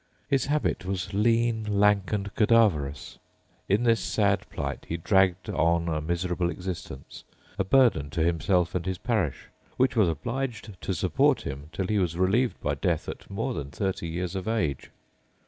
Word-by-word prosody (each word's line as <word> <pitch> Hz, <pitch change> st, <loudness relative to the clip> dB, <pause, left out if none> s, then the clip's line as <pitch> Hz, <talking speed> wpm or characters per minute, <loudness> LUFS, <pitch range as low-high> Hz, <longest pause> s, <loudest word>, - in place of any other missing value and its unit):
His 135 Hz, -1 st, +1 dB
habit 150 Hz, -8 st, 0 dB
was 95 Hz, 0 st, -3 dB
lean, 115 Hz, +2 st, +2 dB, 0.2 s
lank, 105 Hz, -1 st, +3 dB
and 100 Hz, -1 st, -2 dB
cadaverous. 100 Hz, -, +2 dB, 0.5 s
In 105 Hz, +5 st, +3 dB
this 115 Hz, -2 st, +3 dB
sad -, -, 0 dB
plight -, -, -5 dB
he 85 Hz, -, -1 dB
dragged 95 Hz, +1 st, +2 dB
on 85 Hz, +1 st, +1 dB
a 80 Hz, -1 st, -1 dB
miserable 85 Hz, +2 st, -1 dB
existence, 90 Hz, -7 st, -7 dB, 0.4 s
a -, -, +3 dB
burden 95 Hz, -, +3 dB
to 80 Hz, +2 st, -1 dB
himself 85 Hz, +1 st, +1 dB
and 90 Hz, -, -1 dB
his 95 Hz, -1 st, -1 dB
parish, 105 Hz, -, -2 dB, 0.3 s
which 130 Hz, 0 st, +2 dB
was 105 Hz, -6 st, +4 dB
obliged 115 Hz, -, -4 dB
to 95 Hz, -, -2 dB
support -, -, +2 dB
him 70 Hz, +2 st, -6 dB
till 95 Hz, -, -2 dB
he 105 Hz, +2 st, +1 dB
was 85 Hz, -3 st, -1 dB
relieved 105 Hz, +7 st, +1 dB
by -, -, 0 dB
death -, -, -1 dB
at -, -, -8 dB
more -, -, -2 dB
than 70 Hz, -1 st, -5 dB
thirty 95 Hz, +3 st, -3 dB
years 90 Hz, +2 st, -3 dB
of 95 Hz, +2 st, -4 dB
age. 85 Hz, -, -1 dB
95 Hz, 165 wpm, -27 LUFS, 85-110 Hz, 0.5 s, was